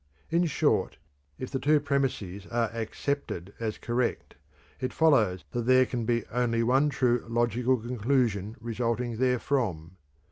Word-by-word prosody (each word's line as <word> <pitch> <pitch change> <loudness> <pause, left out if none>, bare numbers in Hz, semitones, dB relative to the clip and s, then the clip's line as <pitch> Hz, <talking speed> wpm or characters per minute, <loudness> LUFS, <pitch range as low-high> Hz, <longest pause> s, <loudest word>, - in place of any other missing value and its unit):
In 170 +1 +3
short, 150 - +1 0.4
if 130 - -6
the 135 - -1
two 150 +2 +4
premises 135 -10 -2
are 115 -2 0
accepted 115 -4 -3
as 110 -2 -3
correct, 120 0 -2 0.5
it 130 - -3
follows 110 - +3
that 120 -1 -3
there 130 0 +6
can 120 -2 -3
be 115 0 0
only 115 -1 +1
one 135 +5 +3
true 125 -4 +1
logical 120 +2 +1
conclusion 115 -3 0
resulting 115 0 -2
therefrom. 120 - 0
120 Hz, 135 wpm, -28 LUFS, 110-130 Hz, 0.5 s, there